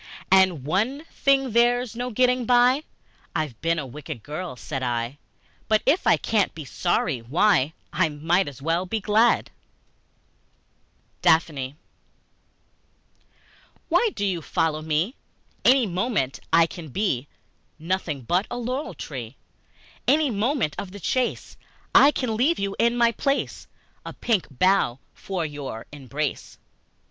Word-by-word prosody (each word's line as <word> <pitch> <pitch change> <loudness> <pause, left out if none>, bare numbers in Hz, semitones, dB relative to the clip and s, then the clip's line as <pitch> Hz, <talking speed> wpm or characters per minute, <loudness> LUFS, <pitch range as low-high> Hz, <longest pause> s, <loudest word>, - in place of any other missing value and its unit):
And, 190 -7 +4
"One 225 - 0
thing 270 -2 +2
there's 240 +1 +2
no 245 +1 -3
getting 250 0 +2
by 250 +4 +4 0.5
I've 150 -8 -3
been 165 0 +1
a 150 - -3
wicked 140 -2 -8
girl," 155 +1 -5
said 130 +3 -5
I; 120 +2 -2 0.5
"But 215 -1 +2
if 295 +7 +2
I - - +6
can't 215 -4 0
be 155 -2 -7
sorry, 155 -3 0
why, 150 - +2 0.2
I 170 0 +2
might 165 +5 +1
as 135 -1 -9
well 165 +4 0
be 220 +3 -1
glad!" 215 +3 +2 1.7
Daphne 145 -4 +2 2.1
WHY 470 - +3
do 205 - -1
you 180 -4 -1
follow 155 0 -1
me? 160 +8 0 0.5
Any 260 -1 +5
moment 185 - -1
I 165 0 +6
can 165 -1 -9
be 145 - -1 0.5
Nothing 160 -4 -3
but 180 - +1
a 245 - -4
laurel 255 +5 -3
tree. 125 -4 -7 0.7
Any 295 -2 +3
moment 225 - 0
of 190 -1 -6
the 205 - -8
chase 250 +7 -2 0.4
I 280 - +8
can 255 -6 -1
leave 280 +10 +2
you 200 0 -2
in 235 +1 +3
my 235 -1 +4
place 275 +4 -2 0.4
A - - -7
pink 220 -6 0
bough 155 -3 +2 0.2
for 185 -4 -4
your 145 -6 -6
embrace. 145 +1 -4
185 Hz, 135 wpm, -24 LUFS, 150-235 Hz, 2.1 s, I